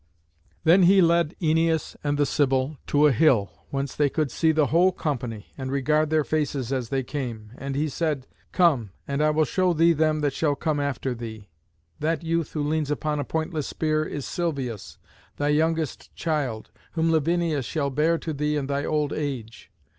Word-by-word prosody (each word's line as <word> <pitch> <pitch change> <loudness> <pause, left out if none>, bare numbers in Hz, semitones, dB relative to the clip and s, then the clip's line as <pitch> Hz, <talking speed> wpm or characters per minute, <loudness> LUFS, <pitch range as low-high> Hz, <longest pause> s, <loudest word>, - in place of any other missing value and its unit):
Then 170 +4 +6
he 190 +2 +6
led 170 -2 +3
Æneas 160 -1 +1
and 145 0 0
the 145 - +3
Sibyl 135 +1 +1
to 145 +1 +4
a 150 - +6
hill, 120 -6 +3 0.2
whence 135 0 -3
they 145 -1 +2
could 150 -2 -1
see 160 +4 +2
the 155 -1 +3
whole 175 +6 +4
company, 125 - -4
and 130 0 -4
regard 150 +3 +1
their 155 -1 +2
faces 140 -4 -1
as 125 -4 -2
they 135 -1 0
came; 120 -6 -5
and 135 0 -5
he 150 +2 +1
said, 150 -2 -2 0.3
"Come, 155 - +3 0.2
and 140 +1 -1
I 155 - +4
will 155 +1 +2
show 185 +2 +1
thee 165 +1 +4
them 155 0 +1
that 145 -2 0
shall 145 -1 +1
come 150 +1 -1
after 135 -2 -2
thee. 110 -4 -8 0.5
That 165 +2 -1
youth 165 -1 -1
who 150 - -1
leans 155 -1 0
upon 150 0 -1
a - - 0
pointless 160 -1 -2
spear 155 -1 0
is 145 -3 -5
Silvius, 125 - -3 0.4
thy 145 0 0
youngest 160 0 0
child, 140 -9 -2 0.2
whom 165 0 +1
Lavinia 165 -1 +1
shall 140 +2 -2
bear 155 +5 +2
to 160 -1 -4
thee 150 +1 -1
in 140 - -2
thy 140 +1 -1
old 150 -1 0
age. 130 -7 -5
150 Hz, 185 wpm, -25 LUFS, 135-160 Hz, 0.5 s, Then